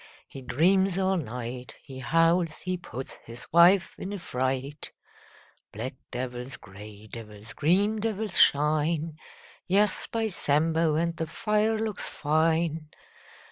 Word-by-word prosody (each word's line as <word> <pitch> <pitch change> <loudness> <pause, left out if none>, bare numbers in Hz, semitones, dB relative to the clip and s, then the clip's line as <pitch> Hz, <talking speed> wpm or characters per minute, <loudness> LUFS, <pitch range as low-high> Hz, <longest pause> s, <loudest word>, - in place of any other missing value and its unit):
He 135 - -10
dreams 185 +8 +2
all 190 0 +2
night. 125 -3 -6
He 130 -1 -9
howls. 165 +3 +2
He 185 0 -2
puts 135 -7 -8
his 115 +1 -10
wife 175 +3 +6
in 190 - -5
a - - -3
fright. 135 -2 -3 0.8
Black 115 +5 -5 0.2
devils, 125 +1 -5
grey 100 +2 -12
devils, 110 0 -10
green 195 - +2
devils 215 -3 -1
shine 155 +2 +3 0.2
— - - -24
Yes, 200 +2 +2
by 225 -1 -1
Sambo, 160 -1 +1
And 170 +1 0
the 160 - -3
fire 215 +5 +1
looks 215 -2 -3
fine! 160 0 0
160 Hz, 130 wpm, -27 LUFS, 130-185 Hz, 0.8 s, wife